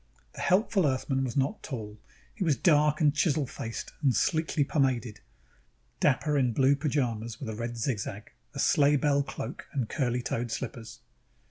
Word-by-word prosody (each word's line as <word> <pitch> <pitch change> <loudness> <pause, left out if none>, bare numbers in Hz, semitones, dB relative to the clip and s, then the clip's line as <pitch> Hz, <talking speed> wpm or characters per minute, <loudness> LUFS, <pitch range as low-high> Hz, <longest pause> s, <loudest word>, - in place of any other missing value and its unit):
_ - - -36
The - - -8
helpful 190 -2 +3
Earthman 135 0 0
was 125 -1 -3
not 140 +11 0
tall. 110 -6 -7 0.3
He 205 - -3
was 155 -5 +3
dark 150 -2 +3
and 150 -2 +4
chisel 155 -2 +1
faced 115 -3 -6
and 135 -5 +3
sleekly 160 +3 +1
pomaded, 130 -6 0 0.8
dapper 150 +1 +2
in 125 -3 +1
blue 135 +3 +4
pajamas 120 -6 -2
with 130 - -5
a 110 - -4
red 120 +1 -4
zigzag, 110 -3 -3 0.2
a - - -5
sleighbell 145 0 +3
cloak 135 -1 -6
and 130 -7 -1
curly 125 -2 -1
toed 120 0 -2
slippers. 115 0 -6
135 Hz, 160 wpm, -29 LUFS, 120-150 Hz, 0.8 s, and